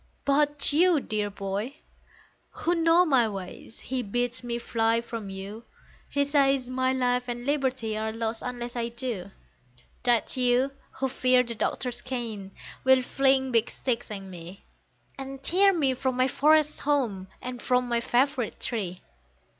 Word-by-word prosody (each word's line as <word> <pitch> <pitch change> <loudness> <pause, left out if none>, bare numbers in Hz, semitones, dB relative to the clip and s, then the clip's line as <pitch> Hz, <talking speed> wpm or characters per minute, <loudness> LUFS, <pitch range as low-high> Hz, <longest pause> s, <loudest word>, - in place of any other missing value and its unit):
But 290 0 +2
you, 340 +1 +5
dear 210 -5 -2
boy, 200 +6 -4 0.7
who 345 - -1
know 335 +1 +4
my 255 -8 +3
ways, 195 +2 -8
he 260 -1 -2
bids 245 +3 -2
me 235 -1 -2
fly 230 -1 +1
from 230 -3 -6
you, 195 +4 -7 0.5
He 285 0 +1
says 275 -3 +2
my 260 0 +1
life 250 -1 +1
and 240 0 -4
liberty 260 -6 0
are 220 +1 -2
lost 225 0 -3
unless 245 -1 -5
I 235 -1 -1
do; 235 -6 -4 0.7
That 240 -2 +2
you, 250 +1 +2 0.2
who 270 - -1
fear 255 -1 +3
the 235 -1 -5
Doctor's 240 +2 -2
cane, 230 -7 -5 0.3
will 260 -1 +5
fling 265 0 +2
big 230 -1 +2
sticks 240 -3 -2
at 200 -2 -5
me, 180 0 -10 0.6
And 270 0 -7
tear 390 +6 +4
me 290 -8 +1
from 255 0 -2
my 255 0 +4
forest 300 +2 +3
home, 240 -10 0
and 250 -1 -6
from 250 -1 +1
my 235 -1 +1
favourite 250 0 0
tree. 190 -7 -3
250 Hz, 155 wpm, -27 LUFS, 225-270 Hz, 0.7 s, you